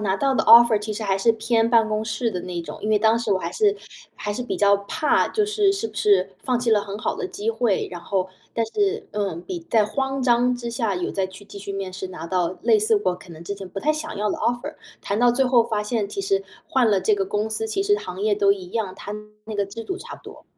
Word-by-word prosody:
拿 195 -2 0
到 270 +6 +1
的 235 - +1
offer 235 -2 +8
其 210 +1 -4
实 215 - -5
还 195 -2 +1
是 230 +4 +3
偏 225 0 +1
办 225 -2 +4
公 215 0 -1
室 220 +1 -1
的 180 - -3
那 175 -1 -5
种， 150 -3 -8
因 215 - -1
为 215 - +4
当 225 +2 +3
时 230 -3 0
我 190 - +2
还 - - -4
是 415 -2 +2 0.4
还 210 - -5
是 240 +4 -3
比 245 - -3
较 200 0 +5
怕 200 +9 +1
就 425 -2 0
是 415 -2 +2
是 390 - -3
不 215 - -17
是 195 -3 +3
放 250 -2 0
弃 240 -1 0
了 210 -2 +4
很 200 0 -6
好 - - -2
的 - - -3
机 210 +2 -5
会。 225 -3 0
然 175 - -6
后 185 +1 -2 0.2
但 230 - 0
是， 410 - -1
嗯， 195 -5 -2
比 350 - -5
在 225 -5 +5
慌 270 +4 -2
张 245 0 +3
之 240 -1 -5
下 230 -4 -1
有 180 -1 -2
再 190 -1 -1
去 190 +2 -13
继 205 - -10
续 200 0 -6
面 195 -1 -4
试， 190 0 -6
拿 180 -2 -7
到 180 0 -1
类 440 - +4
似 430 0 +2
我 - - +3
可 180 0 -14
能 165 0 -10
之 185 +4 -4
前 195 -1 -8
不 195 +2 -6
太 305 - +2
想 310 +1 -3
要 210 - 0
的 - - -2
offer， 240 0 -2 0.3
谈 200 +2 -2
到 245 0 +5
最 265 +2 +2
后 245 -2 +4
发 220 -3 -1
现 210 -1 -1
其 395 - -5
实 390 0 0 0.3
换 260 -4 +3
了 200 -2 +3
这 215 - +3
个 195 -1 -1
公 205 +3 -1
司， 220 0 -2
其 220 - -1
实 410 +1 +3
行 180 - -7
业 210 0 +2
都 200 -1 +4
一 185 -2 -8
样， 215 -5 -2
它 205 - -7 0.3
那 215 -1 -5
个 200 - +1
制 200 +4 -8
度 370 +11 -4
差 - - -9
不 - - -16
多。 - - -12
215 Hz, 320 characters per minute, -23 LUFS, 200-245 Hz, 0.4 s, offer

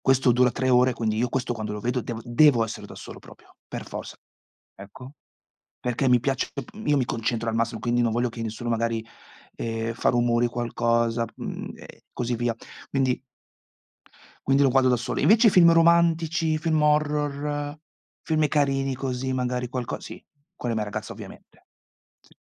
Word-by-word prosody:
Questo 135 -1 +4
dura 125 +1 +4
3 130 +2 -1
ore, 125 0 +4
quindi 110 -2 -1
io 120 +2 0
questo 125 0 -1
quando 110 -2 -4
lo 105 - -5
vedo 125 +3 -1
devo 115 -1 -6
devo 120 0 +4
essere 110 - -6
da - - -11
solo - - -10
proprio, - - -17
per - - -6
forza. - - -7 0.6
Ecco, 105 +7 -12 0.7
perché 125 +2 -1
mi 125 -2 +4
piace, 135 0 -1
dop 140 -4 -6
uhm, 215 +1 -8
io 150 - +4
mi 135 - +2
concentro 115 -1 -2
al 110 - -2
massimo, 115 -1 -1
quindi 120 +1 0
non 115 -2 +1
voglio 120 +1 +1
che 115 0 -8
nessuno 115 +2 -4
magari, 115 -1 -1 0.5
ehm, 115 0 -3
fa 120 - -2
rumori, 120 -1 +2
qualcosa, 115 -1 0
uhm, - - -6
e - - -14
così 120 -1 -2
via. 120 -1 -1 0.3
Quindi 130 -2 +1 1.3
quindi 135 +1 +4
lo 135 - +4
guardo 130 0 +4
da 125 - +4
solo. 120 - -3
Invece 220 +3 +5
i - - +8
film 175 -3 +6
romantici, 165 -1 +3
film 155 -1 +1
horror, 150 -1 0 0.5
film 155 -1 +1
carini 135 -2 +1
così, 130 0 -3
magari 125 -1 -2
qualco 125 -2 -4
sì, - - -10 0.3
con 120 - -4
la 115 - 0
mia 110 - 0
ragazza 105 - -5
ovviamente. - - -13 0.6
Sì. - - -25
125 Hz, 180 wpm, -25 LUFS, 115-145 Hz, 1.3 s, i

